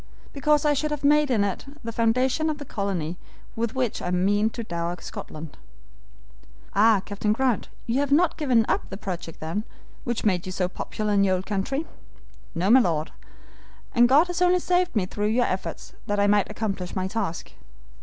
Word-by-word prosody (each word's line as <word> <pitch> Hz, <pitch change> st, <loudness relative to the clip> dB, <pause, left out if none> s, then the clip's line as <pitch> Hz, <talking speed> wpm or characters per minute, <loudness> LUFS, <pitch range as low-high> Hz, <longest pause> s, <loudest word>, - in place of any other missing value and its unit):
"Because 300 Hz, +1 st, +2 dB
I 295 Hz, -, +4 dB
should 305 Hz, +2 st, -1 dB
have 295 Hz, -1 st, -4 dB
made 295 Hz, 0 st, +4 dB
it 205 Hz, -6 st, 0 dB, 0.2 s
the 230 Hz, -, -4 dB
foundation 255 Hz, +7 st, +1 dB
of 305 Hz, -, -2 dB
the 290 Hz, -, -8 dB
colony 180 Hz, -, -3 dB, 0.4 s
with 230 Hz, +2 st, -2 dB
which 255 Hz, -4 st, -1 dB
I -, -, -3 dB
mean 200 Hz, +4 st, +2 dB
to 235 Hz, +1 st, -6 dB
dower 170 Hz, -3 st, -3 dB
Scotland." 155 Hz, -1 st, -8 dB, 1.2 s
"Ah, 210 Hz, -1 st, +4 dB
Captain 210 Hz, +1 st, 0 dB
Grant, 255 Hz, 0 st, 0 dB, 0.2 s
you 240 Hz, +3 st, 0 dB
have 285 Hz, -1 st, -1 dB
not 330 Hz, +3 st, +4 dB
given 250 Hz, -7 st, +2 dB
up -, -, -1 dB
the 195 Hz, -, -6 dB
project, 180 Hz, -5 st, -6 dB
then, 165 Hz, +7 st, -3 dB, 0.4 s
which 240 Hz, -2 st, -2 dB
made 185 Hz, -3 st, +1 dB
you -, -, -3 dB
so 180 Hz, -1 st, 0 dB
popular 210 Hz, +3 st, -3 dB
in 200 Hz, -1 st, +4 dB
our 185 Hz, -, +3 dB
old 185 Hz, +1 st, -4 dB
country?" 220 Hz, +10 st, -2 dB, 0.7 s
"No, 180 Hz, +5 st, +2 dB
my 260 Hz, -, +8 dB
Lord, 160 Hz, -8 st, 0 dB, 0.8 s
and 240 Hz, 0 st, +5 dB
God 290 Hz, +6 st, +6 dB
has 355 Hz, 0 st, -4 dB
only 360 Hz, 0 st, +5 dB
saved 360 Hz, -2 st, +1 dB
me 205 Hz, -4 st, +2 dB
through 205 Hz, +3 st, -2 dB
your 240 Hz, +3 st, +2 dB
efforts 185 Hz, 0 st, -4 dB
that 205 Hz, 0 st, 0 dB
I 200 Hz, -, +4 dB
might 205 Hz, -1 st, +3 dB
accomplish 200 Hz, -4 st, -3 dB
my 185 Hz, -1 st, -1 dB
task. 190 Hz, -5 st, -3 dB
215 Hz, 185 wpm, -25 LUFS, 190-265 Hz, 1.2 s, my